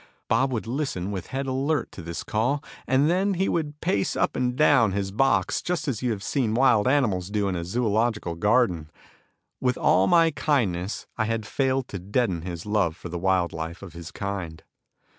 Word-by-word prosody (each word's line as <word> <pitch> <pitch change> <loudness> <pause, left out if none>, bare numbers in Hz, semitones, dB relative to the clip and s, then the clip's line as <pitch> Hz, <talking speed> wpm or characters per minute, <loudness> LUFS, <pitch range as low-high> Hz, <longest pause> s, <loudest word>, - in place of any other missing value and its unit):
Bob 130 +4 +2
would 115 -3 -2
listen 115 -7 -2
with 95 -3 -5
head 135 +1 -3
alert 135 +4 -1
to - - -9
this 85 0 -5
call, 125 +7 0 0.2
and 135 +3 +3
then 190 +4 +2
he 190 +2 +1
would 150 -3 -2
pace 100 -1 0
up - - 0
and 125 -1 0
down 130 -8 +4
his 100 -1 -2
box 135 +6 +2
just 175 -2 -2
as 125 -7 -2
you 125 - 0
have 105 -4 -3
seen 115 -2 0
wild 120 -3 +4
animals 110 -10 +1
do 105 -1 0
in 95 - -1
a 85 - -3
zoological 110 -1 0
garden. 90 -4 +1 0.7
With 125 -1 0
all 95 +1 +3
my 165 -1 +5
kindness 105 - -1
I 110 - +1
had 115 -1 -2
failed 130 +2 0
to 95 - -5
deaden 100 -2 0
his 85 -1 -6
love 105 -6 +1
for 85 - -8
the 85 +1 -4
wild 95 -2 +1
life 80 +3 -6
of 95 - -10
his 85 0 -8
kind. 95 -6 -5
110 Hz, 195 wpm, -25 LUFS, 95-135 Hz, 0.7 s, my